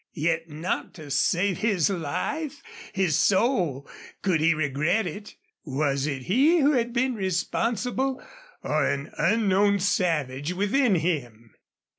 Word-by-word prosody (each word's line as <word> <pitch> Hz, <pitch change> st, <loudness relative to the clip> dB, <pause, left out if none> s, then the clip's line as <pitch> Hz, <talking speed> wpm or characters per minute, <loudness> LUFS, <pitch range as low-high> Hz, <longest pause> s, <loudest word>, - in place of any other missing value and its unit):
Yet 165 Hz, +1 st, -1 dB
not 155 Hz, +4 st, -4 dB
to 150 Hz, -4 st, -10 dB
save 175 Hz, +6 st, +1 dB
his 200 Hz, -8 st, +2 dB
life, 270 Hz, -, -3 dB, 0.3 s
his 190 Hz, -6 st, +1 dB
soul, 180 Hz, -, +1 dB, 0.4 s
could 185 Hz, -5 st, +2 dB
he 165 Hz, 0 st, +4 dB
regret 155 Hz, +8 st, 0 dB
it! 205 Hz, +5 st, -7 dB, 0.3 s
Was 140 Hz, -1 st, -1 dB
it 135 Hz, -3 st, -3 dB
he 275 Hz, -, +3 dB
who 290 Hz, -2 st, +4 dB
had 240 Hz, -4 st, 0 dB
been 255 Hz, +2 st, +1 dB
responsible, 235 Hz, +7 st, -1 dB, 0.4 s
or 150 Hz, -1 st, +1 dB
an 140 Hz, 0 st, -3 dB
unknown 200 Hz, -2 st, +3 dB
savage 160 Hz, -6 st, 0 dB
within 205 Hz, +4 st, +2 dB
him? 120 Hz, -10 st, -3 dB
180 Hz, 125 wpm, -25 LUFS, 150-225 Hz, 0.4 s, he